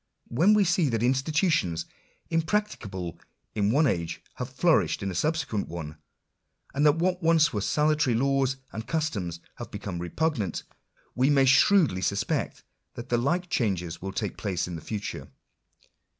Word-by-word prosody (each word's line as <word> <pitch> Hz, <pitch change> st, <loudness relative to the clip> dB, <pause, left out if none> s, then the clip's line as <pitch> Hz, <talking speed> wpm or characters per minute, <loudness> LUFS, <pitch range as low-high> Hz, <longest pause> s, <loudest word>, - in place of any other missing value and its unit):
When 175 Hz, -, +4 dB
we 210 Hz, -, +5 dB
see 175 Hz, -4 st, +2 dB
that 115 Hz, -1 st, 0 dB
institutions 135 Hz, -, +1 dB, 0.5 s
impracticable 160 Hz, -, -2 dB, 0.3 s
in 100 Hz, -1 st, +1 dB
one 145 Hz, +7 st, +4 dB
age 85 Hz, -, -1 dB, 0.2 s
have -, -, -4 dB
flourished -, -, +2 dB
in 95 Hz, -, -2 dB
a -, -, -5 dB
subsequent 135 Hz, -, -1 dB
one; 80 Hz, -3 st, -6 dB, 0.8 s
and 145 Hz, -, 0 dB
that 150 Hz, -, +5 dB
what 180 Hz, +2 st, 0 dB
were 165 Hz, -, -1 dB
once 165 Hz, -2 st, +5 dB
salutary 150 Hz, -4 st, +2 dB
laws 135 Hz, +1 st, +1 dB, 0.2 s
and 110 Hz, +3 st, -6 dB
customs 105 Hz, -, -2 dB, 0.2 s
have -, -, -7 dB
become 85 Hz, -, -5 dB
repugnant; 105 Hz, -, -1 dB, 0.5 s
we 130 Hz, +3 st, +2 dB
may 140 Hz, -2 st, +5 dB
shrewdly 135 Hz, -, +4 dB
suspect 100 Hz, +1 st, -1 dB, 0.3 s
that 120 Hz, +2 st, -8 dB
the 120 Hz, -, +2 dB
like 175 Hz, +8 st, 0 dB
changes 95 Hz, -, -1 dB
will 95 Hz, +1 st, -4 dB
take 100 Hz, +1 st, -3 dB
place 95 Hz, -5 st, -2 dB
in 85 Hz, -2 st, -5 dB
future. 105 Hz, +5 st, -5 dB
130 Hz, 150 wpm, -27 LUFS, 95-155 Hz, 0.8 s, we